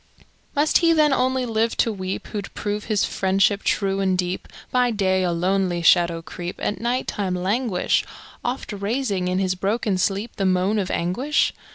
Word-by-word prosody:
Must 295 Hz, +2 st, +3 dB
he 335 Hz, -1 st, +4 dB
then 305 Hz, -3 st, +4 dB
only 260 Hz, 0 st, +1 dB
live 225 Hz, 0 st, 0 dB
to 225 Hz, -, +2 dB
weep, 190 Hz, -1 st, -5 dB
WhoŌĆÖd 205 Hz, -2 st, -5 dB
prove 210 Hz, 0 st, -3 dB
his 215 Hz, -2 st, +1 dB
friendship 195 Hz, +1 st, +1 dB
true 195 Hz, -1 st, 0 dB
and 190 Hz, -1 st, +1 dB
deep 180 Hz, 0 st, -2 dB, 0.2 s
By 250 Hz, -1 st, +3 dB
day 190 Hz, -4 st, +1 dB
a 180 Hz, -1 st, +1 dB
lonely 180 Hz, 0 st, 0 dB
shadow 170 Hz, -1 st, +4 dB
creep, 175 Hz, +2 st, -6 dB
At 205 Hz, -, -3 dB
night 245 Hz, +2 st, 0 dB
time 190 Hz, -3 st, -2 dB
languish, 195 Hz, +2 st, 0 dB, 0.4 s
Oft 245 Hz, -2 st, -3 dB
raising 200 Hz, -2 st, -1 dB
in 180 Hz, 0 st, 0 dB
his 190 Hz, -1 st, +1 dB
broken 200 Hz, +1 st, -1 dB
sleep 200 Hz, +5 st, -1 dB
The 195 Hz, -, 0 dB
moan 185 Hz, +3 st, +2 dB
of 190 Hz, -2 st, -2 dB
anguish? 245 Hz, -, 0 dB
195 Hz, 175 wpm, -23 LUFS, 185-230 Hz, 0.4 s, he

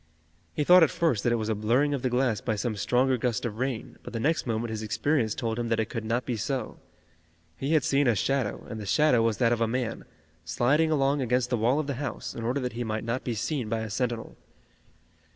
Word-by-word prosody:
He 150 Hz, -, +1 dB
thought 180 Hz, +4 st, +7 dB
at 160 Hz, -, +6 dB
first 145 Hz, -12 st, 0 dB
that 120 Hz, -, +2 dB
it -, -, +3 dB
was 110 Hz, -2 st, -2 dB
a 110 Hz, -, +1 dB
blurring 120 Hz, +8 st, +1 dB
of 140 Hz, -, -2 dB
the 130 Hz, -, 0 dB
glass 125 Hz, -4 st, +1 dB
by 110 Hz, -, -1 dB
some 110 Hz, +1 st, -2 dB
stronger 125 Hz, +5 st, +2 dB
gust 120 Hz, -1 st, -1 dB
of 110 Hz, -1 st, -4 dB
rain, 130 Hz, -3 st, -3 dB
but -, -, -10 dB
the 115 Hz, -, -2 dB
next 150 Hz, +3 st, 0 dB
moment 115 Hz, 0 st, -1 dB
his 110 Hz, -1 st, -4 dB
experience 110 Hz, +1 st, 0 dB
told 115 Hz, -1 st, -2 dB
him 120 Hz, -, -2 dB
that 115 Hz, -, +1 dB
it 110 Hz, -, -1 dB
could 115 Hz, -3 st, -3 dB
not 120 Hz, +3 st, -1 dB
be 125 Hz, -, -2 dB
so. 120 Hz, +2 st, -3 dB, 0.8 s
He 140 Hz, +4 st, -2 dB
had 155 Hz, -4 st, +4 dB
seen 140 Hz, +1 st, +2 dB
a 120 Hz, -, +3 dB
shadow, 130 Hz, +1 st, -1 dB
and 110 Hz, -, -6 dB
the 105 Hz, -, -6 dB
shadow 150 Hz, -1 st, +4 dB
was 115 Hz, -2 st, +1 dB
that 120 Hz, -2 st, +3 dB
of 115 Hz, -, -2 dB
a 115 Hz, -, +3 dB
man, 120 Hz, 0 st, -3 dB, 0.4 s
sliding 125 Hz, -, +2 dB
along 140 Hz, -2 st, +2 dB
against 125 Hz, 0 st, 0 dB
the -, -, +3 dB
wall 120 Hz, +5 st, +2 dB
of 155 Hz, -, -1 dB
the 140 Hz, -, -2 dB
house, 135 Hz, -4 st, -4 dB
in 115 Hz, -, -6 dB
order 125 Hz, +5 st, 0 dB
that 125 Hz, -1 st, -3 dB
he 120 Hz, +1 st, -3 dB
might 110 Hz, -1 st, -3 dB
not 115 Hz, +3 st, -2 dB
be 120 Hz, -, -2 dB
seen 125 Hz, +1 st, -2 dB
by 115 Hz, 0 st, -1 dB
a 110 Hz, -1 st, -5 dB
sentinel. 120 Hz, 0 st, -2 dB
120 Hz, 250 wpm, -27 LUFS, 110-135 Hz, 0.8 s, thought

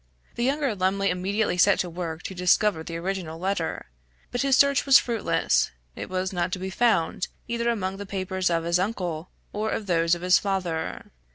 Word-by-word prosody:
The 235 Hz, -, -3 dB
younger 275 Hz, -1 st, +1 dB
Lumley 195 Hz, 0 st, +1 dB
immediately 190 Hz, +1 st, -1 dB
set 200 Hz, +3 st, +5 dB
to 180 Hz, -, -3 dB
work 170 Hz, -1 st, -5 dB
to -, -, -5 dB
discover 180 Hz, 0 st, +2 dB
the 165 Hz, 0 st, -5 dB
original 175 Hz, -2 st, -4 dB
letter, 185 Hz, -1 st, -2 dB, 0.5 s
but 245 Hz, -, -1 dB
his 275 Hz, -2 st, +3 dB
search 280 Hz, -1 st, +4 dB
was 275 Hz, -1 st, +8 dB
fruitless; 235 Hz, -3 st, +1 dB, 0.3 s
it -, -, -6 dB
was 185 Hz, +1 st, -2 dB
not 175 Hz, 0 st, -1 dB
to -, -, 0 dB
be 190 Hz, +1 st, -5 dB
found 190 Hz, -6 st, +1 dB, 0.2 s
either 235 Hz, 0 st, -1 dB
among 195 Hz, -4 st, -2 dB
the 200 Hz, 0 st, -7 dB
papers 190 Hz, -1 st, -1 dB
of 165 Hz, -1 st, 0 dB
his 170 Hz, +1 st, +1 dB
uncle, 180 Hz, -5 st, -3 dB, 0.2 s
or 215 Hz, +1 st, -1 dB
those 170 Hz, -4 st, +1 dB
of 175 Hz, -, -9 dB
his 180 Hz, 0 st, +5 dB
father. 180 Hz, -5 st, -3 dB
190 Hz, 185 wpm, -25 LUFS, 175-210 Hz, 0.5 s, was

